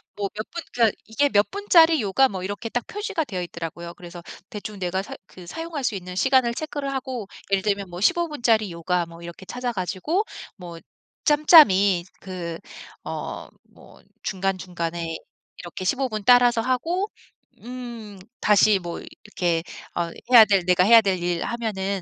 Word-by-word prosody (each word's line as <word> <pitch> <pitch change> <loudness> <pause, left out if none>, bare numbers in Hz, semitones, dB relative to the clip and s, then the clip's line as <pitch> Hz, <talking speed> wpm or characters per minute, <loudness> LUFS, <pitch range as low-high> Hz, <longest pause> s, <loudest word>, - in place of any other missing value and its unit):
뭐 205 -1 -2
몇 215 +1 -6
분 340 -1 -6
그니까 230 -3 +3
이게 285 +6 +1
몇 205 -4 +3
분짜리 335 -7 +4
요가 225 +6 +3
뭐 190 -4 -5
이렇게 205 +4 -5
딱 245 +1 -2
표시가 405 -6 -3
되어 190 -8 -4
있더라고요. 170 0 -7
그래서 175 -1 -11 0.3
대충 210 -1 -7
내가 185 +1 -1
사 - - -8
그 180 - -13
사용할 325 - -6
수 240 - 0
있는 180 -1 -7
시간을 260 +3 +3
체크를 290 -2 -4
하고 260 -5 -4 0.2
예를 195 -1 +3
들면 200 -1 -1
뭐 175 +1 -8
15 340 +11 +3
분짜리 230 - +1
요가 170 +1 -1
뭐 170 0 -13
이렇게 170 +2 -10
찾아 245 +4 -3
가지고 205 - -1 0.3
뭐 175 -3 -9 0.5
짬짬이 205 - +6 0.2
그 175 -3 -6 0.5
어 - - -6 0.2
뭐 - - -18 0.2
중간중간에 175 -3 -3 0.4
이렇게 180 +1 -7
15 265 +6 0
분 215 -2 -4
따라서 245 -2 +5
하고 330 - -1 0.5
음 235 -4 -8 0.2
다시 210 -1 +4
뭐 175 -2 -6
이렇게 175 -5 -3 0.3
어 170 -1 -1 0.2
해야 235 -3 +10
될 195 -4 +2
내가 180 0 +4
해야 230 +3 +8
될 190 -4 -1
일 175 -1 -1
하면은 200 -5 -3
205 Hz, 305 characters per minute, -24 LUFS, 180-250 Hz, 0.5 s, 해야